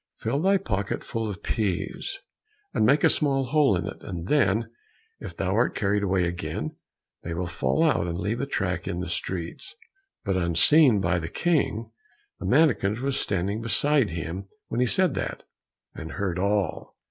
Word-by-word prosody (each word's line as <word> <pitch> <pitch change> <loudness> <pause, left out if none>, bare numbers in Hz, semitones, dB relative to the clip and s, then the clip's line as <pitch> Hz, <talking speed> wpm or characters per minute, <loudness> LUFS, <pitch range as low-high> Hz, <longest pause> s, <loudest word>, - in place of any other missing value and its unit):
Fill 140 - -1
thy 195 +2 +4
pocket 105 - -2
full 115 -1 -3
of 95 -4 -7
peas, 110 - -2 0.5
and 110 - +3
make 140 +2 +4
a - - +8
small 135 -3 +2
hole 145 -6 +3
in - - -3
it, - - -7
and 85 -2 -6
then 115 -6 +3 0.5
if - - -8
thou - - 0
art - - +2
carried 105 0 +1
away 95 -2 +1
again, 85 0 -4 0.5
they 85 0 -5
will 90 +2 -2
fall 80 - 0
out 135 - +2
and 85 0 -3
leave 105 +8 -2
a 140 - -2
track 90 -9 -2
in 85 - -2
the 90 - -3
streets." 90 - -4 0.5
But 95 -2 +1
unseen 100 - +4
by 90 -1 +1
the 80 -1 -5
King, 115 - 0 0.5
the - - -4
mannikin 120 -5 +3
was 140 -1 0
standing 100 +3 -1
beside 125 +2 +2
him 85 +4 -5 0.2
when 115 - -2
he 125 - +3
said 185 +2 +2
that, - - -4 0.5
and 80 - -7
heard 90 -3 -2
all. 100 -2 -1
100 Hz, 175 wpm, -26 LUFS, 90-135 Hz, 0.5 s, a